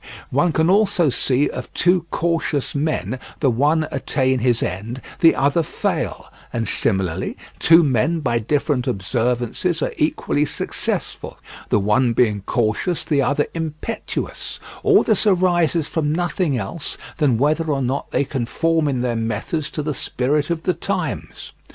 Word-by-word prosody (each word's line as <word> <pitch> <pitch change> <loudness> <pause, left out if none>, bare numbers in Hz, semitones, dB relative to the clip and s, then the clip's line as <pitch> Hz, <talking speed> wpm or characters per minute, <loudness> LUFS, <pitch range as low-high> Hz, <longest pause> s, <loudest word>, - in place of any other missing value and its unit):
One 155 +7 +2
can 160 +1 +2
also 190 -5 +3
see 135 +3 +2
of 125 -1 -6
two 175 0 +2
cautious 165 -4 -1
men 145 -3 -1 0.2
the 135 -4 +3
one 150 +6 +2
attain 130 -2 0
his 120 -1 +2
end, 105 +8 -4 0.2
the 165 - +6
other 140 +5 +2
fail; 155 - -3 0.2
and 115 -2 -2
similarly, 95 -7 -1 0.2
two 165 +1 +6
men 150 +5 +1
by 120 -6 0
different 140 +2 0
observances 120 - 0
are - - -2
equally 150 -1 +1
successful, - - -3 0.3
the - - +3
one 105 +4 +2
being 110 -4 +2
cautious, 120 - 0
the 145 -3 +2
other 145 +2 +1
impetuous; 160 +6 -4 0.2
all 420 -2 +5
this 220 -1 +2
arises 175 -5 +2
from 150 -3 -1
nothing 175 -3 0
else 120 +9 -3 0.2
than 140 -7 +2
whether 155 +5 +1
or 140 -4 0
not 130 +3 -2
they - - +1
conform 150 +5 0
in 130 -3 0
their 120 -1 0
methods 115 +7 -2
to 150 - -4
the 150 0 -2
spirit 145 +3 0
of 165 -1 -2
the 180 - +1
times. 180 -8 -4
145 Hz, 150 wpm, -21 LUFS, 125-165 Hz, 0.3 s, the